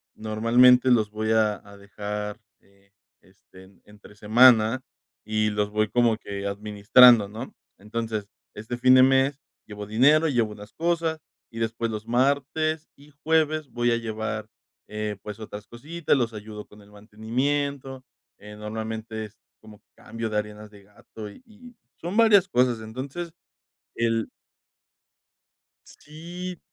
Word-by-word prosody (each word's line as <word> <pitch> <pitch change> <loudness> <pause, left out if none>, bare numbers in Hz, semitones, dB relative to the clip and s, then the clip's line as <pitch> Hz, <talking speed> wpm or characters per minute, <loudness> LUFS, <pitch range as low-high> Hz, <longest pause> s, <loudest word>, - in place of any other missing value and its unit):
normalmente 120 +4 +4
los 110 -4 +3
voy 110 +1 -2
a 110 -2 +3
a 100 0 -14
dejar, 105 +1 -6 0.2
eh, 100 0 -29 0.3
este, 95 +1 -19
entre 105 0 -17
semana, 115 +3 +5 0.4
y 110 0 0
los 105 0 -1
voy 110 0 0
como 120 -1 +2
que 100 -2 -7
administrando, 105 +3 +5
¿no? 115 +5 -8 0.3
Entonces, 110 0 -4 0.3
este 110 +3 -6
fin 130 +1 +5
de 130 - +7
mes, 135 +1 +3 0.3
llevo 105 -1 -8
dinero, 145 +9 +4
llevo 120 -6 0
unas 105 0 -13
cosas, 165 -1 -1 0.3
y 115 - -8
después 115 0 -2
los 110 0 -6
martes 145 +5 0
y 145 +2 -18
jueves, 155 -2 +1
voy 120 0 0
a 115 - +2
llevar, 110 -1 -4 0.4
eh, 105 0 -4
pues, 105 0 -8
otras 105 -1 -9
cositas, 145 +7 -2
los 120 -3 -1
ayudo 105 0 -9
con 105 - -18
el 100 0 -19
mantenimiento, 130 +6 -3 0.4
eh, 105 +1 -11
normalmente 110 +1 -5
es 105 +1 -16 0.2
como 110 -1 -15 0.2
cambio 115 -1 -6
de 105 - -1
arenas 105 0 -5
de 100 -1 -17
gato, 105 +1 -11
y 245 - -17
y 240 +2 -16 0.3
son 175 +5 -4
varias 210 -5 +6
cosas. 125 -4 +1
Entonces, 135 +10 -6 0.6
el 115 -1 0 1.6
Sí, 175 +4 -9
110 Hz, 140 wpm, -25 LUFS, 105-135 Hz, 1.6 s, de